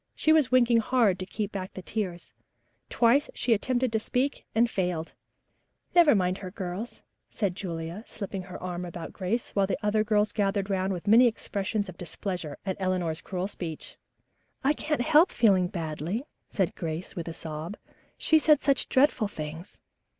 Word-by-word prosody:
She 315 - +3
was 300 -6 +3
winking 240 -2 +5
hard 225 -5 +2
to 185 - -5
keep 210 -1 -3
back 190 -1 -6
the 185 - -7
tears. 185 -5 -4 0.6
Twice 250 +5 +3
she 240 - +2
attempted 250 +3 0
to 220 - +1
speak 255 +5 -1
and 235 +2 +4
failed. 180 -6 -2 0.8
"Never 340 -7 +6
mind 185 -1 +1
her, 185 - -6
dear," 185 0 -4 0.5
said 200 -4 -1
Julia, 170 +1 -5
slipping 195 -2 -5
her 180 0 -9
arm 180 -1 -4
about 175 -2 -7
Grace, 205 +6 -2
while 200 -1 +2
the 195 - -1
other 210 +1 +2
girls 210 -1 +2
gathered 200 -1 0
round 190 0 0
with 180 -1 -4
many 230 +4 +7
expressions 205 -2 -2
of 180 -2 -10
displeasure 175 -3 -5
at 190 -2 -2
Eleanor's 180 -4 -1
cruel 185 0 -3
speech. 165 -6 -7 0.7
"I 280 +3 +4
can't 300 -3 -1
help 315 +6 +5
feeling 190 -6 +4
badly," 170 - -3 0.3
said 190 -4 0
Grace, 165 +1 -5
with 170 -1 -5
a 165 - -4
sob. 160 +5 -6 0.4
"She 315 - +4
said 305 -2 +4
such 275 -3 +3
dreadful 260 -5 +3
things." 160 -1 -8
195 Hz, 170 wpm, -28 LUFS, 180-230 Hz, 0.8 s, many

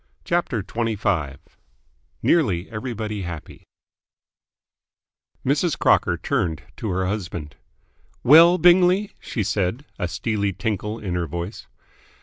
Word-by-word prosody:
CHAPTER 170 - -1
XXV 100 - -1 0.9
NEARLY 100 - +2
EVERYBODY 110 -2 -4
HAPPY 85 -4 -8 1.8
Mrs. 145 +5 +1
Crocker - - +3
turned 80 -1 -1
to 110 - -4
her 95 0 0
husband. 85 -6 -4 0.7
"Well, 165 +6 +8
Bingley?" 180 +3 +4
she 110 - -3
said, 100 +6 -1
a 90 - -1
steely 100 +1 -1
tinkle 105 +3 -3
in 100 -5 -4
her 90 -1 -1
voice. 85 +6 -6
105 Hz, 105 wpm, -23 LUFS, 90-130 Hz, 1.8 s, Well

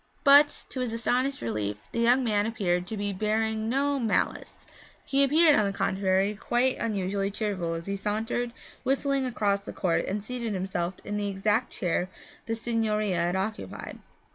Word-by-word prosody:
But 285 +1 +6
to 260 - -6
his 250 -3 -2
astonished 250 +4 0
relief 105 -2 -3
the 235 - -3
young 245 +3 +4
man 210 -2 +1
appeared 180 -6 -1
to 220 - -4
be 205 0 -2
bearing 220 +2 0
no 280 +2 +1
malice. 230 -3 -1 0.4
He 275 0 +3
appeared, 305 +3 +5
on 215 - +3
the 200 -1 -2
contrary, 190 +1 +1
quite 245 +5 0
unusually 195 -3 -1
cheerful 195 -5 -2
as 165 0 -6
he 200 - -2
sauntered, 220 +4 -2 0.3
whistling, 275 0 +1
across 205 -4 0
the - - -7
court 175 -3 0
and 200 +1 -3
seated 235 -2 -3
himself 185 -1 -2
in 210 - -3
the 205 -1 -1
exact 205 +5 0
chair 180 +1 -1 0.4
the 225 - -1
signorina 220 -4 0
had 175 +1 +1
occupied. 210 +4 -4
215 Hz, 165 wpm, -27 LUFS, 195-240 Hz, 0.4 s, But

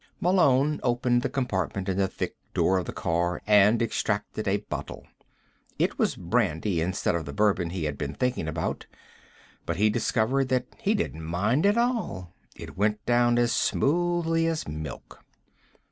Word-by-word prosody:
Malone 150 -5 +3
opened 120 0 +1
the 135 - -1
compartment 100 -8 -2
in 95 - 0
the 95 0 +2
thick - - -5 0.2
door 95 0 +3
of 90 - -4
the - - -4
car 85 +1 -1
and 105 +2 +5
extracted 115 - -2
a - - +2
bottle. - - -6 0.7
It - - 0
was - - +1
brandy 80 +2 0
instead 90 +4 0
of 85 -2 -2
the 70 - -7
bourbon 100 -2 +1
he 90 -1 -4
had 75 -2 -3
been 70 -2 -4
thinking 125 -10 -1
about, 80 +1 -3 0.8
but 85 - -1
he 105 +2 +3
discovered 125 +5 +1
that 125 -1 +1
he 220 -1 +1
didn't 205 - -3
mind 105 - +1
at 205 +3 +3
all. 230 - -1 0.2
It - - -10
went 105 +2 0
down 120 0 +3
as 120 -1 +2
smoothly 165 +1 +1
as 165 -1 -2
milk. 75 -3 -8
110 Hz, 160 wpm, -26 LUFS, 90-135 Hz, 0.8 s, and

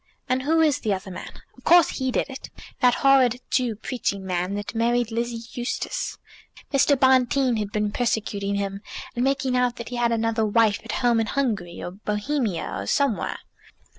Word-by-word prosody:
"And 255 +1 +1
who 320 +4 +2
is 300 -4 +3
the 210 -4 0
other 190 0 -8
man? 180 - -8 0.2
Of 250 - -19
course 345 -1 +6
he 260 -1 -2
did 255 - 0
it." 270 -1 -9 0.3
"That 250 -1 +4
horrid 255 -3 +5
Jew 245 -4 +1
preaching 205 -3 -3
man 180 +1 -1
that 205 +1 -5
married 235 0 +1
Lizzie 235 0 -3
Eustace. 245 - -3 0.6
Mr. 275 0 +4
Bonteen 260 -1 +3
had 210 -1 -3
been 210 -1 -1
persecuting 205 -4 -1
him, 200 0 -3 0.3
and 240 - 0
making 265 -1 +1
out 250 -1 +2
that 235 -2 -7
he 245 - -5
had 240 -1 +2
another 225 0 +1
wife 215 0 +3
at - - -6
home 235 -1 +4
in 225 - 0
Hungary, 215 -12 -2
or 175 - -5
Bohemia, 210 - -2
or 100 - -5
somewhere." 275 - 0
235 Hz, 180 wpm, -24 LUFS, 210-260 Hz, 0.6 s, course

